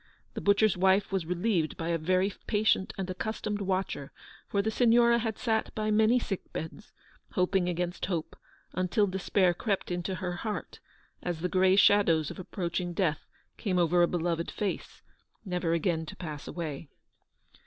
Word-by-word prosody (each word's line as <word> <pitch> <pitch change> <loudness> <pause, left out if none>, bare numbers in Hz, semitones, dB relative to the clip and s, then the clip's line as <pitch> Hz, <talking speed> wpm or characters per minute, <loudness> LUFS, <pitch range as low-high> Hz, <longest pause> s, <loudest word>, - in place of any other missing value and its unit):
The - - -5
butcher's 205 0 +4
wife 190 +2 +3
was 190 -4 -1
relieved 180 -2 0
by 165 0 -3
a 170 - +1
very 185 +4 +1
patient 210 -3 +2
and 190 -1 -3
accustomed 210 +2 -3
watcher, 185 -7 -2 0.4
for 200 -1 0
the 220 - 0
Signora 235 0 +4
had 225 -2 -2
sat 220 -2 0
by 215 0 0
many 220 +3 +4
sick 200 -6 -4
beds, 160 +6 -7 0.4
hoping 180 -1 +2
against 175 +1 -2
hope, 170 -4 -3 0.4
until 185 +4 +2
despair 190 -1 +2
crept 195 +1 -2
into 175 +2 -2
her 180 0 -4
heart, 215 +2 -5 0.4
as 175 -2 -3
the 180 - 0
grey 185 +1 +4
shadows 185 -7 +4
of - - -9
approaching 175 -1 -3
death 165 -4 -1 0.3
came 190 -5 -1
over 175 0 +3
a 175 - +5
beloved 170 -1 -1
face, 205 -2 -4 0.4
never 180 -3 -1
again 165 -1 0
to - - -8
pass 155 -5 -7
away. 155 -3 -5
185 Hz, 160 wpm, -29 LUFS, 175-205 Hz, 0.4 s, a